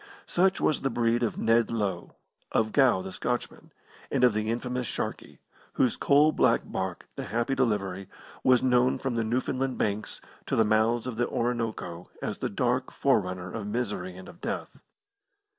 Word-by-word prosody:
Such 190 Hz, +2 st, +2 dB
was 155 Hz, -, +1 dB
the 135 Hz, -, 0 dB
breed 120 Hz, 0 st, +1 dB
of 115 Hz, -, -1 dB
Ned 115 Hz, +1 st, +3 dB
Low, 100 Hz, -6 st, -2 dB, 0.4 s
of 110 Hz, -1 st, +1 dB
Gow 125 Hz, -9 st, +4 dB
the 95 Hz, -, -6 dB
Scotchman, 120 Hz, +5 st, -4 dB, 0.4 s
and -, -, 0 dB
of 125 Hz, -3 st, +6 dB
the 110 Hz, +1 st, -1 dB
infamous 125 Hz, +1 st, -2 dB
Sharkey, -, -, -4 dB, 0.4 s
whose 125 Hz, -, +2 dB
coal 145 Hz, +2 st, +4 dB
black -, -, +3 dB
barque, -, -, -4 dB
the -, -, -5 dB
Happy 120 Hz, +6 st, -1 dB
Delivery, 100 Hz, -7 st, -1 dB, 0.3 s
was 130 Hz, -2 st, +5 dB
known 125 Hz, 0 st, +3 dB
from 135 Hz, -2 st, -2 dB
the 115 Hz, -1 st, 0 dB
Newfoundland 130 Hz, +3 st, -1 dB
Banks 105 Hz, 0 st, -2 dB, 0.3 s
to -, -, 0 dB
the 110 Hz, -, +5 dB
mouths 110 Hz, +2 st, +2 dB
of 125 Hz, -3 st, -4 dB
the 120 Hz, -, +1 dB
Orinoco 115 Hz, -8 st, -2 dB
as -, -, -4 dB
the -, -, -1 dB
dark 125 Hz, +4 st, 0 dB
forerunner 90 Hz, -8 st, 0 dB
of 110 Hz, -3 st, -4 dB
misery 105 Hz, -5 st, -3 dB
and 95 Hz, -, -10 dB
of 175 Hz, -, -14 dB
death. -, -, -4 dB
115 Hz, 170 wpm, -28 LUFS, 105-125 Hz, 0.4 s, of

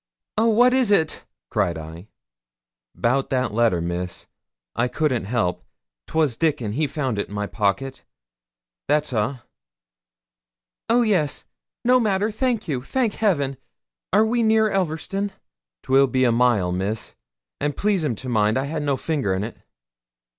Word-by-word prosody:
'Oh, 225 Hz, +2 st, +3 dB
what 245 Hz, +3 st, +5 dB
is 260 Hz, -4 st, +3 dB
it?' 160 Hz, -6 st, +2 dB, 0.3 s
cried 95 Hz, -7 st, 0 dB
I. 80 Hz, +4 st, -9 dB, 0.9 s
''Bout 135 Hz, +3 st, +1 dB
that 130 Hz, -4 st, 0 dB
letter, 115 Hz, -6 st, +3 dB
Miss; 90 Hz, +1 st, -4 dB, 0.5 s
I 120 Hz, -, +1 dB
couldn't 130 Hz, -5 st, 0 dB
help. 105 Hz, -5 st, -1 dB, 0.4 s
'Twas 155 Hz, -7 st, +1 dB
Dickon, 145 Hz, -7 st, 0 dB
he 150 Hz, +7 st, 0 dB
found 130 Hz, -8 st, -2 dB
it -, -, -2 dB
in 105 Hz, -, -9 dB
my 105 Hz, 0 st, -1 dB
pocket. 120 Hz, +6 st, -1 dB, 0.8 s
That's 150 Hz, -1 st, +1 dB
a'.' 120 Hz, +3 st, -1 dB, 1.5 s
'Oh 240 Hz, +1 st, +4 dB
yes! 180 Hz, -10 st, 0 dB, 0.4 s
no 250 Hz, +1 st, +5 dB
matter 210 Hz, -1 st, +1 dB
thank 240 Hz, 0 st, -1 dB
you 135 Hz, -6 st, -1 dB
thank 230 Hz, -, 0 dB
Heaven! 145 Hz, -11 st, 0 dB, 0.5 s
Are 210 Hz, +4 st, +5 dB
we 235 Hz, +2 st, +1 dB
near 220 Hz, -1 st, +3 dB
Elverston?' 195 Hz, +2 st, -2 dB, 0.5 s
''Twill 135 Hz, +1 st, +4 dB
be 130 Hz, +1 st, +1 dB
a 120 Hz, -, +4 dB
mile, 115 Hz, -6 st, +2 dB
Miss: 95 Hz, +5 st, -2 dB, 0.5 s
and 145 Hz, -1 st, -2 dB
please'm 180 Hz, -, +1 dB
to 130 Hz, -, -8 dB
mind 110 Hz, -1 st, +2 dB
I 135 Hz, -, 0 dB
had 155 Hz, +2 st, -3 dB
no 140 Hz, -2 st, 0 dB
finger 135 Hz, -, -1 dB
in't.' 105 Hz, +5 st, -4 dB
135 Hz, 145 wpm, -23 LUFS, -, 1.5 s, what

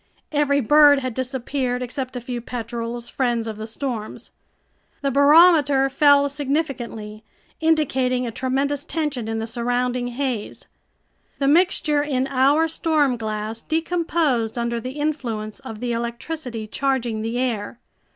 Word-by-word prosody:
Every 285 Hz, -1 st, +2 dB
bird 295 Hz, +3 st, +6 dB
had 255 Hz, -2 st, -3 dB
disappeared 255 Hz, 0 st, -2 dB
except 255 Hz, +1 st, -5 dB
a 245 Hz, -, -4 dB
few 245 Hz, 0 st, -5 dB
petrels, 235 Hz, 0 st, -5 dB
friends 240 Hz, -3 st, -1 dB
of 220 Hz, -2 st, -5 dB
the 215 Hz, 0 st, -6 dB
storms. 225 Hz, -2 st, -5 dB, 0.7 s
The 275 Hz, -1 st, 0 dB
barometer 285 Hz, -1 st, +6 dB
fell 285 Hz, 0 st, +5 dB
significantly, 270 Hz, -7 st, -3 dB, 0.4 s
indicating 265 Hz, -6 st, +1 dB
a 235 Hz, -, -3 dB
tremendous 275 Hz, +4 st, -1 dB
tension 295 Hz, -8 st, -3 dB
in 225 Hz, 0 st, -2 dB
the 225 Hz, -, -2 dB
surrounding 245 Hz, +1 st, -1 dB
haze. 245 Hz, -3 st, -4 dB, 0.7 s
The 275 Hz, -, 0 dB
mixture 305 Hz, -2 st, +3 dB
in 270 Hz, -3 st, 0 dB
our 275 Hz, +4 st, +3 dB
stormglass 230 Hz, -9 st, -1 dB
decomposed 320 Hz, -8 st, 0 dB
under 235 Hz, 0 st, -1 dB
the 255 Hz, +2 st, -5 dB
influence 255 Hz, -8 st, -3 dB
of 220 Hz, 0 st, -9 dB
the 245 Hz, -1 st, -2 dB
electricity 235 Hz, +1 st, -4 dB
charging 240 Hz, -1 st, -1 dB
the 225 Hz, +2 st, -3 dB
air. 235 Hz, -3 st, -2 dB
255 Hz, 130 wpm, -22 LUFS, 235-285 Hz, 0.7 s, bird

